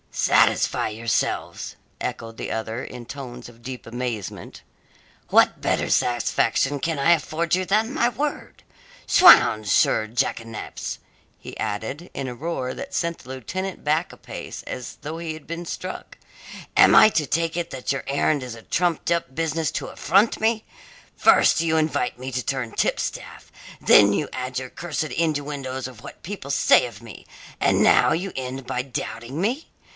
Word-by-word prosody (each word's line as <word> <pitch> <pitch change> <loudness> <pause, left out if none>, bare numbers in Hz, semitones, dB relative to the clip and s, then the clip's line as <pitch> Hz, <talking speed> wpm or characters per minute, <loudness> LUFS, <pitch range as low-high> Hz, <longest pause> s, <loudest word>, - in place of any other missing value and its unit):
"Satisfy - - +3
yourselves?" 110 +1 -2 0.3
echoed 115 -1 -4
the - - -5
other, 115 +2 -3
in 125 -2 -9
tones 130 -2 -8
of 120 -1 -16
deep 125 +1 -7
amazement. 115 -4 -5 0.7
"What - - +4
better - - 0
satisfaction 120 +3 +1
can 160 0 -2
I 165 +5 +4
afford 165 0 +1
you 185 0 -1
than 215 +6 +1
my 240 -6 +2
word? 285 +6 -4 0.4
'Swounds, 110 - +7
sir 110 - +3
jackanapes," 115 -1 -3 0.4
he - - -10
added, 110 - -4
in 135 - -4
a 125 - -5
roar 130 -3 -3
that 275 0 -8
sent 170 -1 -1
the 130 - -15
lieutenant 185 - -5
back 155 +3 +1
a - - -13
pace - - -8
as 125 - -7
though 155 +2 -5
he 165 -2 -4
had 155 -2 -12
been 170 +1 -5
struck, 185 +2 -7 0.6
"am - - +7
I - - +9
to 160 -7 0
take 165 +3 0
it 170 -1 -2
that 130 0 -3
your 135 - -2
errand 140 0 +1
is 125 -2 -6
a 115 - -13
trumped 175 -1 0
up 170 -6 0
business 160 0 -1
to - - -3
affront 200 +8 +2
me? 220 0 +1 0.5
First - - +5
you 160 -1 +1
invite 155 -6 0
me 130 +1 -5
to 125 0 -1
turn 130 -4 -2
tipstaff, - - -3 0.3
then 100 -1 +6
you 145 - 0
add 130 0 -3
your 130 -1 -8
cursed 165 -3 -3
innuendoes 145 -5 -2
of 125 -3 -12
what - - -11
people 175 -7 -6
say 140 - +5
of 110 -4 -12
me, 115 -3 -11 0.4
and - - +3
now - - +5
you 185 +3 -1
end 130 0 -5
by 125 - -2
doubting 120 +1 -5
me! 240 - -1
140 Hz, 165 wpm, -23 LUFS, 125-170 Hz, 0.7 s, I